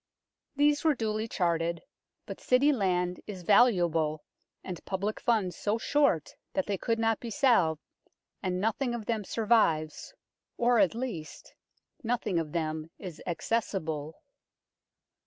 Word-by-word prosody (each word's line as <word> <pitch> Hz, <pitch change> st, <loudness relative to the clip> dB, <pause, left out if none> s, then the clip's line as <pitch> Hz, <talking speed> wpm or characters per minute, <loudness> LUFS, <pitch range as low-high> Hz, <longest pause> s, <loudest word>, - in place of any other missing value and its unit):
These 290 Hz, +1 st, +3 dB
were 315 Hz, -3 st, +3 dB
duly 220 Hz, -1 st, -2 dB
charted, 170 Hz, -4 st, -1 dB, 0.4 s
but -, -, -7 dB
City 265 Hz, +4 st, +4 dB
land 180 Hz, -5 st, 0 dB
is 190 Hz, -4 st, -7 dB
valuable 170 Hz, -8 st, +3 dB, 0.4 s
and 180 Hz, -3 st, -7 dB
public 200 Hz, +3 st, -3 dB
funds 210 Hz, -7 st, +1 dB
so 210 Hz, +2 st, -1 dB
short 280 Hz, -, +1 dB, 0.2 s
that 190 Hz, -, 0 dB
they 205 Hz, -, -1 dB
could 230 Hz, +4 st, -1 dB
not 225 Hz, -1 st, +1 dB
be 235 Hz, -, -6 dB
salved, 215 Hz, -, +2 dB, 0.6 s
and 180 Hz, -1 st, -1 dB
nothing 240 Hz, +4 st, 0 dB
of 225 Hz, -3 st, -6 dB
them 220 Hz, -2 st, -1 dB
survives 210 Hz, -, +1 dB, 0.4 s
or, 240 Hz, 0 st, +3 dB
at 200 Hz, +1 st, +3 dB
least, 225 Hz, -11 st, -6 dB, 0.5 s
nothing 225 Hz, -6 st, 0 dB
of 155 Hz, -2 st, -4 dB
them 155 Hz, -1 st, -2 dB
is 175 Hz, -5 st, -9 dB
acces 205 Hz, +4 st, -1 dB
sible. 155 Hz, -1 st, -5 dB
200 Hz, 135 wpm, -29 LUFS, 170-235 Hz, 0.6 s, City